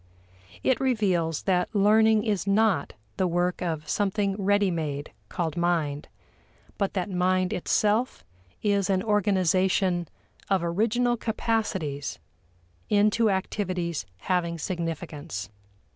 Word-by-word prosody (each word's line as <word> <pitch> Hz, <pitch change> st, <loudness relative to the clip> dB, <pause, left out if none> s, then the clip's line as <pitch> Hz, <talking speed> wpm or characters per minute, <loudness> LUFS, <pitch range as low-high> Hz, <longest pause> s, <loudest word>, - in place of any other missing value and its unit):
It 260 Hz, -, +2 dB
reveals 190 Hz, -, +1 dB
that 185 Hz, +2 st, 0 dB
learning 215 Hz, +1 st, +4 dB
is 205 Hz, -4 st, -1 dB
not 200 Hz, -5 st, +2 dB, 0.2 s
the 185 Hz, -, +2 dB
work 175 Hz, +1 st, 0 dB
of 160 Hz, -4 st, -3 dB
something 200 Hz, +1 st, 0 dB
ready 205 Hz, -1 st, +3 dB
made 150 Hz, -3 st, -3 dB, 0.2 s
called 165 Hz, -3 st, -2 dB
mind, 165 Hz, -4 st, 0 dB, 0.7 s
but 200 Hz, -1 st, -1 dB
that 185 Hz, -1 st, -1 dB
mind 185 Hz, 0 st, +1 dB
itself 215 Hz, +7 st, 0 dB, 0.4 s
is 200 Hz, -2 st, +1 dB
an 190 Hz, -1 st, +1 dB
organization 190 Hz, -3 st, +2 dB, 0.4 s
of 190 Hz, -3 st, +2 dB
original 230 Hz, +8 st, +1 dB
capacities 210 Hz, -11 st, -2 dB, 0.7 s
into 215 Hz, +2 st, +3 dB
activities 185 Hz, -, -2 dB
having 170 Hz, -2 st, 0 dB
significance. 160 Hz, -, -4 dB
185 Hz, 105 wpm, -26 LUFS, 170-210 Hz, 0.7 s, learning